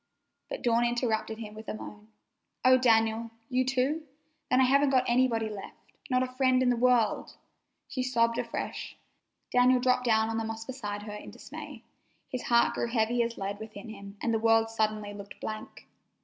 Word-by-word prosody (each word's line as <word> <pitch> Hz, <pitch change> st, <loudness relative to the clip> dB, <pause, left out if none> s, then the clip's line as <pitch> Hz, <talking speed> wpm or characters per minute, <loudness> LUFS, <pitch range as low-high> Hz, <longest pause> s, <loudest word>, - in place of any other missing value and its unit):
But -, -, -5 dB
Dawn 235 Hz, -1 st, +3 dB
interrupted 235 Hz, -2 st, 0 dB
him 215 Hz, -2 st, -7 dB
with 220 Hz, +1 st, -10 dB
a -, -, -3 dB
moan. 210 Hz, 0 st, -10 dB, 0.6 s
"Oh, 255 Hz, 0 st, +8 dB
Daniel! 225 Hz, -2 st, +3 dB, 0.2 s
You 255 Hz, 0 st, +2 dB
too? 265 Hz, +4 st, 0 dB, 0.5 s
Then 255 Hz, -, +4 dB
I -, -, +6 dB
haven't 275 Hz, +2 st, +4 dB
got 260 Hz, -2 st, +4 dB
anybody 240 Hz, -2 st, +2 dB
left. 210 Hz, -2 st, -8 dB, 0.3 s
Not 255 Hz, 0 st, +3 dB
a 255 Hz, 0 st, -5 dB
friend 255 Hz, -1 st, +3 dB
in 250 Hz, -1 st, +4 dB
all 235 Hz, -, -3 dB
the -, -, -3 dB
world!" 245 Hz, -3 st, +2 dB, 0.5 s
She 260 Hz, -, -3 dB
sobbed 230 Hz, -2 st, +1 dB
afresh. 235 Hz, -1 st, -4 dB, 0.5 s
Daniel 250 Hz, +1 st, +5 dB
dropped 250 Hz, 0 st, +2 dB
down 220 Hz, -1 st, +3 dB
on 225 Hz, 0 st, -1 dB
the -, -, -2 dB
moss 225 Hz, 0 st, -5 dB
beside 205 Hz, -6 st, -5 dB
her 210 Hz, -1 st, -7 dB
in 210 Hz, -, -8 dB
dismay. -, -, -10 dB, 0.5 s
His 255 Hz, -, -3 dB
heart 235 Hz, -1 st, +4 dB
grew -, -, -1 dB
heavy 235 Hz, 0 st, +1 dB
as 235 Hz, 0 st, -2 dB
lead 200 Hz, +1 st, -4 dB
within 220 Hz, 0 st, -9 dB
him, 200 Hz, -1 st, -10 dB
and 230 Hz, -, +1 dB
the 225 Hz, -, +2 dB
world 225 Hz, 0 st, +3 dB
suddenly 215 Hz, -2 st, -1 dB
looked 200 Hz, -1 st, -10 dB
blank. 215 Hz, 0 st, -7 dB
230 Hz, 190 wpm, -29 LUFS, 220-255 Hz, 0.6 s, Oh